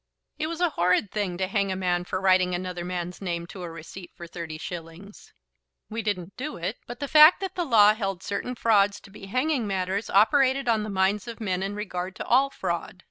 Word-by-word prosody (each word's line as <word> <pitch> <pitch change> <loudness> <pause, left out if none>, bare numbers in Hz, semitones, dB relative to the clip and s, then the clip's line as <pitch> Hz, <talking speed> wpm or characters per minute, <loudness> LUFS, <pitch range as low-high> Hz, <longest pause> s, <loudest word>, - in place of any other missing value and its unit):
"It 310 - -1
was 335 +1 -5
a 350 -2 +2
horrid 180 +1 +1
thing 200 -4 -2
to 190 - 0
hang 200 0 0
a - - -1
man 180 -1 -1
for 185 - -3
writing 185 -1 +3
another 180 -1 -4
man's 180 0 -5
name 170 -3 -3
to 185 +2 -10
a 175 - -5
receipt 165 +3 -10
for 170 - -9
thirty 165 -2 -7
shillings." 170 +4 -9 0.6
"We 225 +1 -2
didn't 200 -4 -3
do 295 +4 -5
it, 180 +7 -4
but 240 +1 -8
the 285 - -3
fact 305 +4 +8
that 385 - -3
the 350 - -2
law 215 -6 +6
held 195 -4 -4
certain 225 +5 -3
frauds 205 -4 +3
to 195 - -16
be 195 -1 -11
hanging 255 +2 0
matters 190 +1 -2
operated 265 +5 +3
on 225 -2 +2
the 215 - -4
minds 195 +1 0
of 235 0 -7
men 190 -4 -2
in 195 +1 -3
regard 185 -3 -4
to - - -6
all 265 +3 +4
fraud. 180 -5 -4
195 Hz, 220 wpm, -26 LUFS, 180-230 Hz, 0.6 s, fact